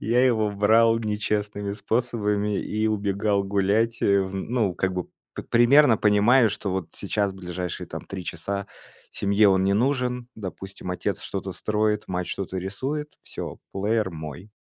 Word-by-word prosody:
я 120 +3 +3
его 110 -4 +2
брал 115 +3 +4
нечестными 105 -2 -2
способами 105 -1 0
и 110 +1 -1
убегал 100 -1 0
гулять, 100 +4 +1
э, 100 -1 +4
в 95 0 -6
ну, 105 -1 -1
как 95 +1 0
бы 90 -1 -2 0.3
п - - -5
примерно 120 +1 +5
понимая, 110 +4 +5
что 100 - -3
вот 95 -3 -3
сейчас, 100 0 -1
ближайшие 90 -2 -5
там - - -7
3 95 -2 -6
часа, 100 +5 -4 0.5
семье 100 +1 +3
он 95 -1 +3
не 100 - +3
нужен. 125 +1 0
Допустим, 95 -2 -7
отец 90 - -2
что-то - - -4
строит, 105 0 0
мать 90 -1 -2
что-то 95 -1 -4
рисует, 130 +11 -3
всё, - - -7
плеер 105 +1 0
мой. 80 +4 -8
105 Hz, 150 wpm, -25 LUFS, 95-110 Hz, 0.5 s, примерно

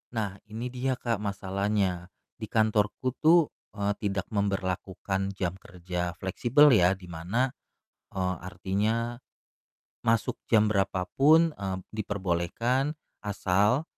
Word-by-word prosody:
Nah, 100 -3 -2
ini 115 +3 -5
dia 130 +1 -1
Kak 115 -4 -2
masalahnya, 100 -2 -1 0.3
di 110 - -5
kantorku 110 +3 +1
tuh, 165 0 +5 0.2
eee, 100 -1 0
tidak 100 -2 -2
memberlakukan 95 -1 -2
jam 90 -2 -1
kerja 90 -2 -4
fleksibel 120 - +4
ya, 95 -4 +5
di 90 -1 -13
mana, 100 +11 -1 0.6
eee, 95 -1 -1
artinya 105 +6 -1 0.9
masuk 115 -1 +1
jam 110 -2 +5
berapa 95 -3 0
pun, 160 +3 +5
eee, 95 -2 -4 0.2
diperbolehkan 110 - -1 0.2
asal 105 - +1
100 Hz, 110 wpm, -28 LUFS, 95-115 Hz, 0.9 s, tuh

